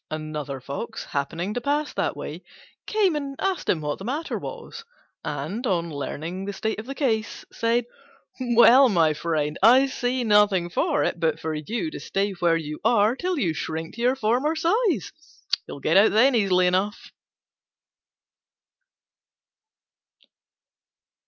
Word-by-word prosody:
Another 150 Hz, -3 st, -5 dB
Fox, 140 Hz, +2 st, -6 dB
happening 165 Hz, +8 st, -3 dB
to 245 Hz, -, -3 dB
pass 290 Hz, +3 st, -1 dB
that -, -, -2 dB
way, -, -, -6 dB, 0.5 s
came 405 Hz, -6 st, +2 dB
and 280 Hz, -2 st, -4 dB
asked 385 Hz, -3 st, -2 dB
him 160 Hz, -, +2 dB
what 150 Hz, -1 st, -3 dB
the -, -, -8 dB
matter 290 Hz, +9 st, -3 dB
was; 470 Hz, -1 st, -8 dB, 0.4 s
and, 155 Hz, -, -4 dB
on 170 Hz, -4 st, -1 dB
learning 160 Hz, +6 st, -5 dB
the 200 Hz, -, -4 dB
state 220 Hz, +2 st, -3 dB
of 220 Hz, -, -8 dB
the 275 Hz, -, -5 dB
case, 220 Hz, -7 st, -1 dB
said, 230 Hz, +1 st, 0 dB, 0.5 s
"Well, 245 Hz, +1 st, +6 dB
my 165 Hz, -6 st, +3 dB
friend, 150 Hz, -1 st, -2 dB
I 250 Hz, +6 st, +7 dB
see 255 Hz, -1 st, -2 dB
nothing 205 Hz, -5 st, +3 dB
for 310 Hz, -, +1 dB
it -, -, -1 dB
but 160 Hz, -1 st, 0 dB
for 160 Hz, 0 st, -3 dB
you 225 Hz, -, -3 dB
to -, -, -7 dB
stay 200 Hz, +1 st, -1 dB
where 170 Hz, -3 st, +1 dB
you 150 Hz, -1 st, -6 dB
are 225 Hz, 0 st, +3 dB
till 360 Hz, +4 st, -2 dB
you 175 Hz, -, 0 dB
shrink 160 Hz, +1 st, -5 dB
to 235 Hz, -, -8 dB
your 250 Hz, +2 st, +3 dB
former 260 Hz, +6 st, +1 dB
size; 365 Hz, +4 st, +1 dB, 0.6 s
you'll -, -, -8 dB
get -, -, +2 dB
out 200 Hz, +1 st, +5 dB
then 255 Hz, +6 st, +5 dB
easily 190 Hz, -5 st, +3 dB
enough." 190 Hz, +4 st, -1 dB
210 Hz, 150 wpm, -24 LUFS, 165-260 Hz, 0.6 s, I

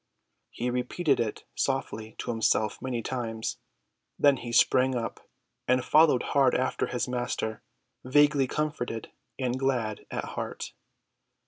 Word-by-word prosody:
He 125 Hz, +1 st, -2 dB
repeated 130 Hz, +5 st, +1 dB
it 110 Hz, -3 st, -2 dB
softly 110 Hz, -5 st, -2 dB
to -, -, -3 dB
himself 110 Hz, -2 st, +1 dB
many 125 Hz, -3 st, -2 dB
times. 115 Hz, -3 st, -3 dB, 0.6 s
Then 140 Hz, -2 st, +5 dB
he 120 Hz, -, -6 dB
sprang 130 Hz, +2 st, +4 dB
up 115 Hz, -2 st, -5 dB, 0.4 s
and 125 Hz, 0 st, +2 dB
followed 155 Hz, -5 st, +5 dB
hard 135 Hz, -3 st, +4 dB
after 130 Hz, -, 0 dB
his 125 Hz, -, -2 dB
Master, 120 Hz, -3 st, -2 dB, 0.4 s
vaguely 145 Hz, +1 st, +4 dB
comforted 125 Hz, -7 st, -3 dB, 0.3 s
and 130 Hz, -1 st, -1 dB
glad 120 Hz, -6 st, -1 dB
at -, -, -3 dB
heart. -, -, -5 dB
125 Hz, 125 wpm, -28 LUFS, 115-135 Hz, 0.6 s, Then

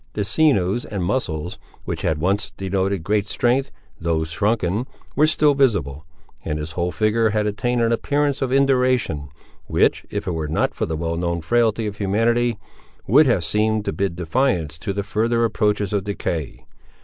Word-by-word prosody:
The 105 Hz, -, -2 dB
sinews 110 Hz, -, +2 dB
and 100 Hz, -4 st, -4 dB
muscles, 90 Hz, -6 st, -2 dB, 0.3 s
which -, -, -4 dB
had 80 Hz, -, 0 dB
once 100 Hz, +6 st, 0 dB
denoted 95 Hz, -1 st, -1 dB
great 105 Hz, +2 st, 0 dB
strength, 130 Hz, +5 st, +1 dB, 0.3 s
though 80 Hz, -1 st, 0 dB
shrunken, 100 Hz, +6 st, -1 dB, 0.3 s
were 155 Hz, +2 st, +4 dB
still 150 Hz, -1 st, +3 dB
visible; 85 Hz, -, 0 dB, 0.4 s
and 75 Hz, -, -2 dB
his 75 Hz, +1 st, -5 dB
whole 85 Hz, +2 st, -1 dB
figure 110 Hz, +6 st, +2 dB
had 105 Hz, 0 st, 0 dB
attained 120 Hz, +4 st, 0 dB
an 115 Hz, -, +2 dB
appearance 145 Hz, +4 st, 0 dB
of 130 Hz, -2 st, -1 dB
induration, 130 Hz, -, +2 dB, 0.4 s
which, -, -, +2 dB
if 105 Hz, 0 st, -4 dB
it 90 Hz, -, -1 dB
were 80 Hz, -2 st, -3 dB
not 75 Hz, -, 0 dB
for -, -, -2 dB
the 80 Hz, -1 st, -3 dB
well 85 Hz, +1 st, -2 dB
known 85 Hz, 0 st, -1 dB
frailty 115 Hz, +3 st, +1 dB
of 105 Hz, -1 st, -4 dB
humanity, 115 Hz, +4 st, +1 dB, 0.5 s
would 140 Hz, +8 st, +5 dB
have 110 Hz, -9 st, +2 dB
seemed 105 Hz, +4 st, +1 dB
to -, -, -1 dB
bid 95 Hz, +1 st, -1 dB
defiance 85 Hz, -, 0 dB
to 100 Hz, -, -3 dB
the 100 Hz, +1 st, -2 dB
further 115 Hz, +3 st, 0 dB
approaches 105 Hz, -3 st, 0 dB
of 100 Hz, -2 st, 0 dB
decay. 85 Hz, -7 st, -4 dB
105 Hz, 175 wpm, -22 LUFS, 85-120 Hz, 0.5 s, would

